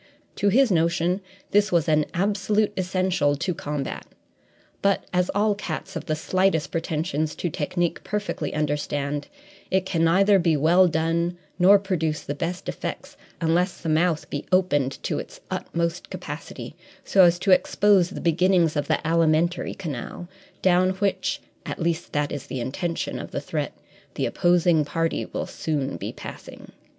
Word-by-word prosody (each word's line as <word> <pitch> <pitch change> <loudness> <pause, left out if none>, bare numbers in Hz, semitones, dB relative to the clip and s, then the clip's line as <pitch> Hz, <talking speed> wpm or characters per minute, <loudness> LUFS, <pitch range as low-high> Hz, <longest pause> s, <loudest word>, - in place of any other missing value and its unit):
To 200 - +3
his 255 +2 +4
notion, 170 +2 +1 0.3
this 205 0 +3
was 170 -2 +2
an 155 -1 +3
absolute 205 +2 +1
essential 185 -5 +1
to 165 +5 -2
combat; 145 -3 -4 0.7
but, 200 -1 +2
as 180 0 +2
all 210 +1 +3
cats 195 -1 -5
of 165 - -5
the 155 - +1
slightest 185 0 +1
pretensions 155 -2 -2
to 175 - -3
technique 170 +4 -1
perfectly 205 -3 -3
understand, 145 -1 -2 0.4
it 190 0 +1
can 170 -3 0
neither 195 +4 +5
be 165 -3 +2
well 175 +5 +5
done 165 +2 0 0.2
nor 195 +3 +8
produce 165 -6 -1
the 145 - -4
best 170 +5 -4
effects - - -5 0.2
unless 175 +2 +1
the 165 - -4
mouth 160 0 +1
be 145 - -3
opened 145 -8 +2
to - - -1
its - - -9
utmost 170 0 -2
capacity - - -7 0.3
so 195 - +5
as 175 0 +5
to 190 +2 +1
expose 190 0 +4
the - - -7
beginnings 170 -1 +3
of 145 - -1
the - - 0
alimentary 165 +1 +2
canal, 165 0 -6 0.4
down 185 0 +4
which 275 +9 -1 0.2
at - - -5
least 170 0 -1
that 145 0 0
is 145 - -5
the 130 - -4
intention 165 +8 -3
of - - -7
the - - -3
threat - - -3 0.4
the - - 0
opposing 175 -3 +3
party 165 +3 -1
will - - -4
soon 140 -4 -2
be - - -5
passing. - - -10
170 Hz, 155 wpm, -24 LUFS, 155-185 Hz, 0.7 s, nor